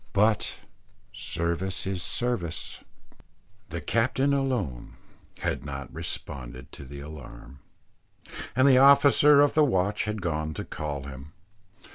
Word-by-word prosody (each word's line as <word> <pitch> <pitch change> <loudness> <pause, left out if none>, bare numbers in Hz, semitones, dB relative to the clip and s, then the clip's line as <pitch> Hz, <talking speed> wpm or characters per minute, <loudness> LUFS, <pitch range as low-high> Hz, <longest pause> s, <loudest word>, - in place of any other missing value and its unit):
But 105 +1 +2 0.6
service 85 +3 -2
is 95 -2 -2
service 90 -6 -2 0.9
the - - -5
captain 130 +4 +1
alone 125 - -2 0.5
has 70 - -1
not 70 -1 -7
responded 65 -1 -6
to 70 - -10
the 70 +1 -9
alarm, 70 -3 -11 1.0
and 130 +2 +5
the 130 -2 +7
officer 140 +1 +7
of 145 - +4
the 155 - +5
watch 105 -6 +1
has 105 0 -2
gone 80 -5 -3
to - - -5
call 75 -2 -5
him. 70 +2 -10
90 Hz, 120 wpm, -27 LUFS, -, 1.0 s, the